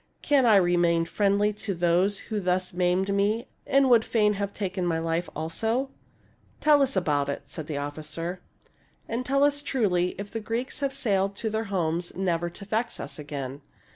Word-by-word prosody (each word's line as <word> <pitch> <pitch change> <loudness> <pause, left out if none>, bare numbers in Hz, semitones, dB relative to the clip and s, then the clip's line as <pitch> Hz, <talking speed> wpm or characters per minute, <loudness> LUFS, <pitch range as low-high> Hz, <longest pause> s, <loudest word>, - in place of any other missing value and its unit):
Can 275 -4 +4
I 220 - +7
remain 175 -3 +3
friendly 205 +3 +2
to 205 -1 -4
those 175 +4 +2 0.2
who 210 - +1
thus 185 -1 0
maimed 180 +2 +1
me 210 +4 +1 0.2
and 275 0 +4
would 235 -3 +6
fain 210 -2 +2
have 200 0 -3
taken 190 -2 -3
my 170 -2 +1
life 165 +1 -1
also 225 - -1 0.2
} - - -36
" - - -34
" - - -34
Tell 300 -1 +5
us 270 -3 +1
about 145 -6 +1
it," 140 - -3
said 150 +1 -8
the 150 - -3
officer; 155 +5 -4 0.3
" - - -37
and 235 +2 -2
tell 275 +2 +2
us 290 0 +3
truly 190 -11 0
if 200 +1 -7
the 225 - -3
Greeks 230 +6 -3
have 275 -1 0
sailed 200 -7 0
to 220 +1 -3
their 220 +1 -1
homes 175 -3 -1
never 175 -2 0
to 200 +4 -10
vex 220 +4 -2
us - - -6
again." 140 -2 -6
195 Hz, 200 wpm, -26 LUFS, 170-225 Hz, 0.3 s, I